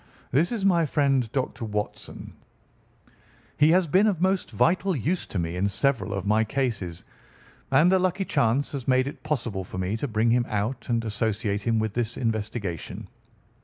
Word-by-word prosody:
"This 155 +7 +2
is 220 -5 -1
my 170 -4 +3
friend, 135 -6 +1
Dr. 130 -2 -2
Watson. 105 -1 -5 1.2
He 150 +1 +4
has 180 +2 +4
been 190 +7 +3
of 195 -6 +1
most 190 +1 +1
vital 185 +2 +2
use 165 - -1
to - - -5
me 85 0 -2
in 95 +3 +1
several 115 +1 0
of 100 - -4
my 105 +2 +3
cases, 110 -9 -2 0.7
and 150 +7 +5
a 190 - +4
lucky 185 +1 0
chance 120 +1 +1
has 135 -4 -5
made 130 0 +3
it 140 - -7
possible 120 -10 -2
for 90 - -8
me 95 +3 -1
to 145 - -3
bring 115 0 +1
him 120 0 +2
out 110 +6 -2
and 115 -1 0
associate 105 -1 -1
him 115 +2 +1
with 110 -1 -1
this 120 -1 -2
investigation." 105 - -3
120 Hz, 175 wpm, -26 LUFS, 105-150 Hz, 1.2 s, and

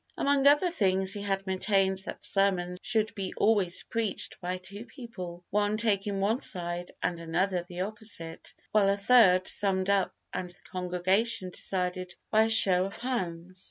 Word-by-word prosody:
Among 280 0 +3
other 295 +5 +5
things, 190 - +1
he 205 - -4
had 195 -1 -2
maintained 190 0 +1
that - - -7
sermons 180 -3 +1
should 215 0 0
be 195 -3 -5
always 200 -5 +2
preached 225 -3 -2
by 180 +1 -3
two 200 +4 -8
people, 180 - -9
one 210 +1 +1
taking 205 -3 +1
one 215 +6 +1
side 175 -1 -3
and 170 - -1
another 175 +3 -1
the 175 +1 -7
opposite, 200 -5 -6 0.2
while 205 -2 +4
a 200 - +1
third 200 -4 +5
summed 195 -1 +1
up 195 -2 +2 0.2
and 180 - -4
the 175 - -11
congregation 185 +2 +1
decided 180 -1 -3 0.2
by 220 +1 +5
a - - -1
show 190 -5 +5
of 195 - -7
hands. 185 -7 -4
195 Hz, 160 wpm, -28 LUFS, 180-215 Hz, 0.2 s, other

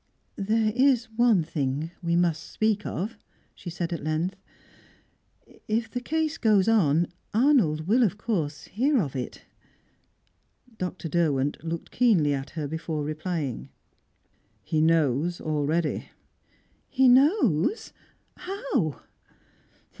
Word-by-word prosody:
"There 215 +2 +1
is 250 -3 +3
one 230 -7 +4
thing 150 0 -2
we 170 -1 0
must 170 -3 0
speak 215 -1 0
of," 210 +5 -4 0.3
she 175 - -9
said 170 0 -3
at 165 - -5
length 160 +5 -1 1.3
"If 225 +1 -1
the 245 - -3
case 315 +3 -1
goes 210 -4 +3
on, 170 -8 +3 0.3
Arnold 220 - +3
will 235 +6 +4
of 205 -4 +2
course 170 -10 -2
hear 265 +6 +1
of 145 -9 -2
it." 125 -2 -5 1.4
Dr. 180 -2 -4
Derwent 145 -4 0
looked 165 0 -5
keenly 190 -13 +3
at 135 -1 -4
her 150 -2 -2
before 160 0 -3
replying. 155 -3 -4 0.9
"He 155 -2 0
knows 160 +1 +2
already." 155 +1 -1 0.8
"He 265 -1 +3
knows? 260 - +3 0.4
How?" 275 - -2
175 Hz, 115 wpm, -26 LUFS, 155-225 Hz, 1.4 s, one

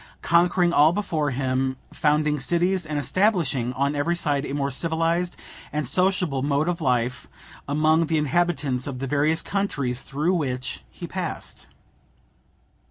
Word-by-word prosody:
conquering 175 +1 +3
all 150 +1 +6
before 165 -6 -1
him, 130 0 -1 0.2
founding 150 0 +1
cities, 175 +4 +1
and 150 0 -2
establishing 145 - +1
on 140 +3 0
every 165 +4 0
side 145 -5 0
a - - -5
more 140 0 -1
civilized 165 +4 0 0.3
and 150 -3 -2
sociable 180 -2 +1
mode 145 +3 +1
of 175 -1 -1
life 125 -1 0 0.4
among 155 +3 +2
the 160 0 +1
inhabitants 150 -4 0
of 135 -3 -4
the 135 - -3
various 150 +4 +1
countries 140 -11 -1
through 150 +6 -1
which 130 -7 -3
he - - -8
passed. - - -5
150 Hz, 140 wpm, -24 LUFS, 135-170 Hz, 0.4 s, all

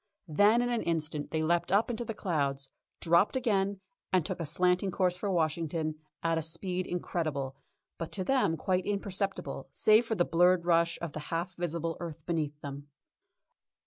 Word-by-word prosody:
Then 205 +9 +4
in 245 - 0
an 235 - 0
instant 155 -3 -1
they 160 0 -1
leapt 170 +2 +1
up 210 +5 +3
into 240 0 -3
the 225 -2 -5
clouds, 140 -8 -1 0.3
dropped 170 +8 +4
again, 200 -6 +1 0.3
and 185 -4 +3
took 185 -2 -3
a 165 - -2
slanting 180 +4 +2
course 180 -1 +1
for 200 +3 -3
Washington 160 -2 0 0.3
at 165 -1 +2
a - - -2
speed 180 +3 -3
incredible, 155 -6 -2 0.4
but 165 - -4
to 190 - -2
them 245 -8 +2
quite 185 +3 0
imperceptible, 195 -8 -2
save 215 +9 +4
for 225 - 0
the 175 -3 +2
blurred 175 +1 +4
rush 170 0 +3
of 165 -3 -4
the - - -4
half 170 +3 -2
visible 165 -1 -2
earth 165 -3 -7
behind 160 -4 -1
them. 140 0 -7
175 Hz, 175 wpm, -30 LUFS, 160-195 Hz, 0.4 s, Then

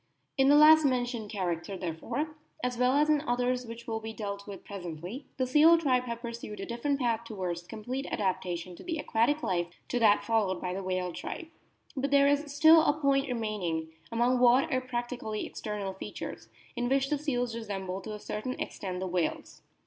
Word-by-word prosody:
In 270 -1 +4
the 290 - +7
last 310 +1 +8
mentioned 245 -5 0
character, 185 -2 -3
therefore, 235 - -3 0.3
as 250 0 0
well 250 +1 +3
as 295 +2 +4
in 305 -2 +3
others 250 -2 0
which 230 +1 -8
will 225 -1 -2
be 220 0 -6
dealt 200 -2 -5
with 200 -2 -8
presently, 180 - -7
the 260 - +1
seal 305 +6 +6
tribe 255 -6 +2
have 235 0 -5
pursued 230 -3 -6
a 195 - -4
different 275 +4 -1
path 235 -3 0
towards 185 -6 -4
the 175 - -23
complete 245 +5 -5
adaptation 180 -2 -2
to - - -11
the 335 -2 -3
aquatic 290 +2 +1
life 175 -2 0 0.2
to 245 - 0
that 210 -3 +5
followed 210 -5 +1
by 180 0 -3
the 195 - -3
whale 185 -1 -2
tribe. 325 - -6 0.5
But 275 +1 -1
there 280 0 +5
is 285 +1 +1
still 315 +3 +7
a 300 -1 +2
point 275 -1 +2
remain 220 -4 -2
ing, 160 -2 -2 0.2
among 240 +2 +2
what 250 +2 +5
are 255 - +2
practically 240 -3 -4
external 205 -3 -4
features, 190 - -7 0.3
in 245 0 -1
which 270 +1 +1
the 295 - +1
seals 245 -5 -1
resemble 195 -4 -4
to 215 +2 -6
a - - -8
certain 215 +5 -4
extent 185 -2 -4
the 190 - -2
whales. 175 -2 -2
235 Hz, 195 wpm, -30 LUFS, 195-270 Hz, 0.5 s, last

